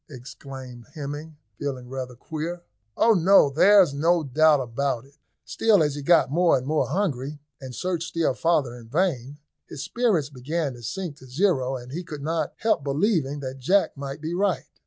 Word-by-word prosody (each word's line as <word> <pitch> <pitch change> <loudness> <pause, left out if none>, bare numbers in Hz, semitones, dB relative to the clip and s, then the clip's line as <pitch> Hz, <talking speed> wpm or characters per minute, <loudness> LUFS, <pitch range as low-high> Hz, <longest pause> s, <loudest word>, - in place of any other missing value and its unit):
exclaimed 130 -2 -10
Hemming, 150 +1 -6 0.2
feeling 130 -4 -4
rather 130 -1 -6
queer. 160 +6 -5 0.3
"Oh, 230 - +5
no! 185 -5 +5
there's 185 +1 +5
no 165 +3 +2
doubt 150 +2 +4
about 125 0 -2
it." 140 - -22 0.3
Still, 210 -7 +3
as 150 -2 0
he 145 - -5
got 165 -2 +4
more 170 -1 +4
and 130 - -5
more 155 +2 +1
hungry, 145 -4 -2 0.2
and 130 -2 -8
searched 175 0 -2
still 165 -5 0
farther 145 -6 +1
in 120 -2 -12
vain, 145 -4 -1 0.3
his 145 -2 -7
spirits 180 - 0
began 140 +2 -3
to 120 - -12
sink 155 - -5
to 130 - -15
zero, 135 -3 +1
and 125 0 -11
he 170 +5 -4
could 150 -5 -8
lot 160 +2 -1
help 220 -10 +1
believing 145 -1 0
that 135 0 -6
Jack 190 +10 +2
might 140 +1 -6
be 160 +2 -4
right. 190 0 0
145 Hz, 180 wpm, -25 LUFS, 135-170 Hz, 0.3 s, Oh